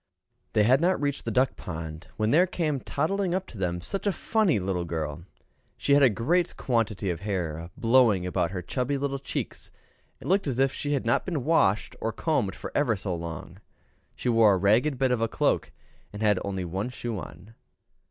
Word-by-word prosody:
They 105 - +4
had 130 +6 +4
not 180 +2 +2
reached 140 -1 -2
the - - -1
duck 130 0 +2
pond, 80 0 -7
when 110 0 +1
there 175 +5 +5
came 155 -6 -1
toddling 180 +7 -1
up 190 0 -2
to 115 - -12
them 90 -2 -1
such 195 - -4
a - - +4
funny 210 - +1
little 95 -2 -1
girl. 80 -1 -4 0.5
She 140 - +2
had 145 - +6
a 135 - +7
great 160 - 0
quantity 110 -6 0
of 85 - -4
hair 85 -5 -3
blowing 115 -6 +4
about 90 -2 0
her 90 0 -5
chubby 130 +8 -1
little 140 0 -2
cheeks, 135 - -5 0.5
and - - -9
looked 195 -1 +2
as 130 -3 -1
if 135 0 +2
she 145 +1 -2
had 140 - -1
not 115 - +2
been 160 -8 -3
washed 110 -11 +2
or 115 - -1
combed 115 -9 -1
for - - -7
ever 135 -6 +2
so 95 -1 -3
long. 85 +2 -6 0.6
She - - -5
wore 115 -4 +5
a - - +1
ragged 110 +9 +3
bit 130 -1 +2
of 125 -2 +1
a 115 - +2
cloak, - - 0 0.4
and 105 +1 -5
had 105 -3 +3
only 95 -2 -3
one 95 +7 -3
shoe 120 -4 -4
on. 100 +6 -11
115 Hz, 200 wpm, -27 LUFS, 95-140 Hz, 0.6 s, a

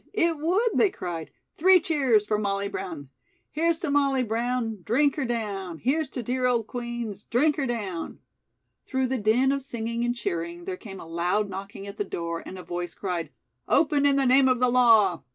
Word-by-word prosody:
It 335 -6 +2
would!" 370 +10 +2
they 415 - +4
cried. 175 - -6 0.3
"Three 370 +3 +6
cheers 270 -10 +2
for 210 0 0
Molly 200 -1 -1
Brown!" 165 -8 -6 0.4
"'Here's 330 +2 +1
to 320 - -1
Molly 275 -2 +2
Brown, 230 -1 -1
drink 275 - +2
her 295 - -1
down! 200 -7 -3
Here's 275 - 0
to 250 - -5
dear 250 +2 0
old 235 -3 +1
Queen's, 235 -4 -5
drink 290 +5 +2
her 275 -3 0
down.'" 200 -8 -4 0.7
Through 260 -1 0
the 255 0 -1
din 230 +6 +3
of 275 0 -1
singing 235 -2 -3
and 240 0 0
cheering, 170 -5 -4
there 185 - -3
came 195 0 -10
a - - -9
loud 175 +5 -1
knocking 195 +1 -7
at 200 +1 -9
the 205 - 0
door 170 -3 -4
and 190 - -8
a 180 - -8
voice 175 0 -5
cried: 180 -4 -3 0.4
"Open 290 -3 +3
in 280 - +3
the 275 -1 +2
name 260 +1 +5
of 255 -1 +2
the 250 0 +3
law!" 225 - +5
235 Hz, 195 wpm, -26 LUFS, 195-270 Hz, 0.7 s, Three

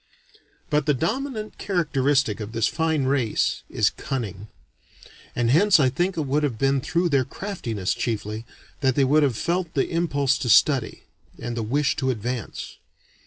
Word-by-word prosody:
But 150 0 +1
the 150 - +3
dominant 220 - -3
characteristic 140 - +1
of 105 +1 -6
this 115 -1 +1
fine 160 -1 0
race 130 -4 0
is - - +2
cunning. 105 -7 -5 0.9
And 120 -1 +1
hence 185 +4 +5
I 130 -3 +4
think 175 +8 -1
it 155 - -1
would 140 +3 +1
have 140 -7 -1
been 135 +2 +2
through 170 +6 0
their 140 -4 +3
craftiness, 125 - -3
chiefly, 110 -1 -3 0.4
that 130 -3 +1
they 140 - +3
would 145 +4 +4
have 135 -6 +1
felt 175 -1 -2
the 135 - +1
impulse 145 -5 +1
to 130 -6 -2
study, 130 0 +3 0.3
and 120 0 -5
the 115 - -2
wish 140 +6 +1
to 130 - 0
advance. 120 -1 -4
135 Hz, 165 wpm, -24 LUFS, 120-160 Hz, 0.9 s, hence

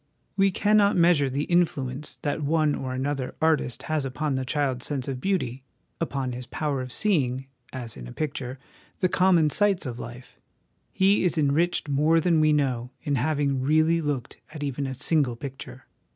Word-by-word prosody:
We 195 0 +4
cannot 205 +1 +3
measure 170 -5 +4
the 140 +3 -1
influence 150 -6 0
that 145 +2 -1
one 155 0 +2
or 130 -2 -4
another 135 0 -2
artist 155 -6 +1
has 155 -2 -1
upon 140 +2 -2
the 130 0 -1
child's 130 -2 -1
sense 135 -4 -3
of 130 -2 -4
beauty, 135 -10 -1 0.4
upon 135 -6 -2
his 125 0 -7
power 140 -1 -2
of 130 -1 -6
seeing, 135 - 0 0.3
as 120 -3 -7
in 60 -2 -9
a - - -9
picture, 135 - -4 0.4
the 185 - +3
common 180 -4 +4
sights 205 -2 +2
of 120 -2 -5
life; 125 +1 -10 0.5
he 195 +1 +3
is 175 -3 +1
enriched 155 +3 +1
more 150 +4 +3
than 165 -1 +3
we 155 0 +4
know 130 -5 0
in 145 - -1
having 140 0 +1
really 155 +4 +3
looked 145 -5 -3
at 150 -2 -6
even 140 0 -2
a 130 - -4
single 140 -2 +1
picture. 130 0 -8
145 Hz, 175 wpm, -26 LUFS, 130-160 Hz, 0.5 s, We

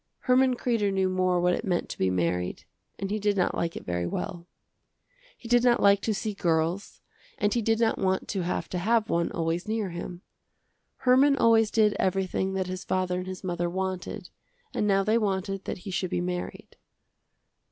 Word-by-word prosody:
Herman 255 0 +3
Kreder 230 -5 0
knew 190 -1 +1
more 185 -1 +1
what 180 0 +2
it - - -2
meant 180 -5 -1
to - - -6
be 95 - +2
married 90 0 -1 0.3
and 195 0 -4
he 215 - -1
did 205 -1 +1
not 185 - +1
like 165 0 -2
it - - -7
very 90 0 -2
well. 170 - -5 0.9
He 235 - -11
did 240 0 +4
not 245 -1 +4
like 200 0 +5
to 220 - -1
see 215 +1 -3
girls 170 +1 -1 0.4
and 205 0 +1
he 240 - +1
did 225 0 +1
not 225 -1 +2
want 190 -1 0
to 195 - -1
have 175 +1 -2
to 180 - -2
have 220 +3 +1
one 170 0 +1
always 165 +2 -2
near 215 -4 -1
him. 175 +1 -7 0.8
Herman 265 +3 +5
always 225 -3 +4
did 215 -2 +3
everything 190 0 0
that 190 -1 -1
his 185 +1 -5
father 185 -1 -1
and 185 - -6
his 185 0 -7
mother 175 -1 -1
wanted 190 0 -4 0.4
and 210 - 0
now 195 -1 +3
they 215 +3 +2
wanted 195 -2 -2
that - - -4
he 195 - -4
should 185 0 -1
be - - -1
married. 180 0 -5
190 Hz, 195 wpm, -27 LUFS, 180-215 Hz, 0.9 s, like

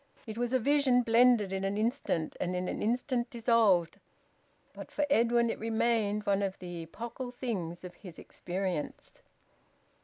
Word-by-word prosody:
It 220 -2 -6
was 240 +1 -2
a 260 - +4
vision 260 -1 +3
blended 230 -4 +4
in 190 0 -2
an 195 +1 -1
instant 220 - -1
and 180 0 -2
in 180 0 -2
an - - -3
instant 240 +2 0
dissolved, 225 -7 +2 0.7
but - - -9
for 295 - 0
Edwin 235 -2 +3
it - - -6
remained 220 -2 0
one 200 0 +2
of 195 -1 -2
the 175 -2 -7
epochal 235 +9 -7
things 190 -10 -4
of 180 -1 -8
his 180 -5 -12
experience. 180 -3 -5
220 Hz, 155 wpm, -30 LUFS, 185-240 Hz, 0.7 s, a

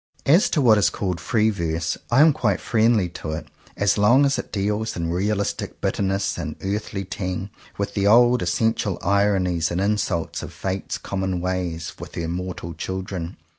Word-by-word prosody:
As 165 +8 +5
to 150 - +1
what 110 -4 +6
is 100 - +4
called 90 -4 -3
Free 110 -2 +2
Verse, 85 -3 -2
I 120 +4 +5
am 155 0 +7
quite 105 -10 0
friendly 110 -4 +2
to 80 -2 -6
it, 80 - -5 0.3
as 100 +1 +2
long 125 +7 +5
as 140 0 +1
it - - -7
deals, 105 +2 -1
in 85 -1 -2
realistic 100 +3 -2
bitterness 100 0 -1
and - - -4
earthly 100 0 -3
tang, 95 0 -4 0.3
with 100 - -2
the 100 -1 +1
old 120 +3 +6
essential 100 +2 0
ironies 95 -4 +2
and 85 - -2
insults 100 -4 -1
of - - -8
Fate's 95 0 -3
com 100 - -5
mon 95 -2 -1
ways 85 -3 -3
with - - -9
her 85 -1 -3
mortal 90 -1 -4
children. 95 -2 -5
100 Hz, 175 wpm, -23 LUFS, 90-105 Hz, 0.3 s, am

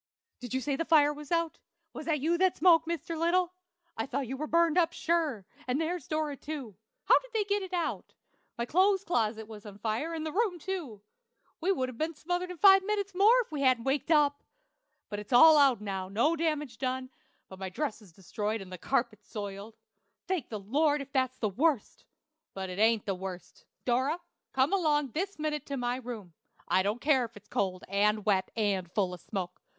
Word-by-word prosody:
"Did 250 0 -5
you 260 - 0
say 280 +1 -1
the 330 - -1
fire 300 -3 +4
was 295 0 -11
out? 335 -1 0 0.3
Was - - -8
that 300 -4 +1
you 330 +4 +2
that 375 -1 +3
spoke, 330 -1 +5
Mr. 335 0 -3
Little? 345 +2 +1 0.4
I 225 - -3
thought 270 +1 -2
you 265 - -4
were 305 +3 -4
burned 335 0 +3
up, 340 -2 +3
sure; 315 - 0 0.2
and 255 +3 0
there's 325 -2 -2
Dora, 310 -2 -1
too. 275 -8 -7 0.3
How - - +6
did - - -16
they 430 - +3
get 405 0 0
it 380 -1 -7
out? 350 -2 -3 0.4
My 235 - -1
clothes 380 +7 +3
closet 220 - -1
was 215 -2 -10
on 205 -2 -10
fire, 225 +10 -2
and 315 -1 -4
the 315 - -3
room, 400 -1 0
too! 315 - -5 0.6
We 360 +4 +1
would 260 -9 0
have 255 -2 -9
been 320 +1 -1
smothered 355 +4 -2
in 360 - -7
five 385 +1 +7
minutes 405 -1 -2
more 430 +7 +5
if 455 - -10
we 295 -2 -3
hadn't 255 -3 +3
waked 270 +4 -1
up! 290 -3 +3 0.7
But 205 - -5
it's 210 +3 -10
all 315 +6 +9
out 270 -7 +5
now, 195 -2 -4
and 195 - -13
no 300 +9 +3
damage 300 -7 -2
done, 255 0 -2 0.4
but 190 - -12
my 190 -1 -4
dresses 210 - -4
destroyed 210 +5 -3
and 185 -2 -9
the 180 - -7
carpet 235 -4 -1
spoiled. 205 0 -7 0.5
Thank 365 -8 -2
the 215 - -4
Lord, 290 +8 +1
if 280 - -17
that's 260 -2 0
the 220 - 0
worst! 265 - 0 0.5
But 190 -1 -4
it 180 - -6
ain't 225 0 +3
the 195 - 0
worst. 185 -1 -8 0.2
Dora, 260 +7 +1 0.3
come 265 +6 +2
along 295 -7 +2
this 380 - -3
minute 300 -1 -3
to 280 - -3
my 245 0 -1
room. 230 -8 -8 0.3
I 185 - +3
don't 210 +5 -1
care 280 -4 +3
if 230 -1 -12
it 205 - -14
is 210 - -32
cold, 185 -2 -1
and 210 +2 +1
wet, 195 -3 +2
and 195 -5 0
full 190 -3 0
of 175 - -9
smoke. 180 -3 -5
270 Hz, 210 wpm, -30 LUFS, 215-330 Hz, 0.7 s, all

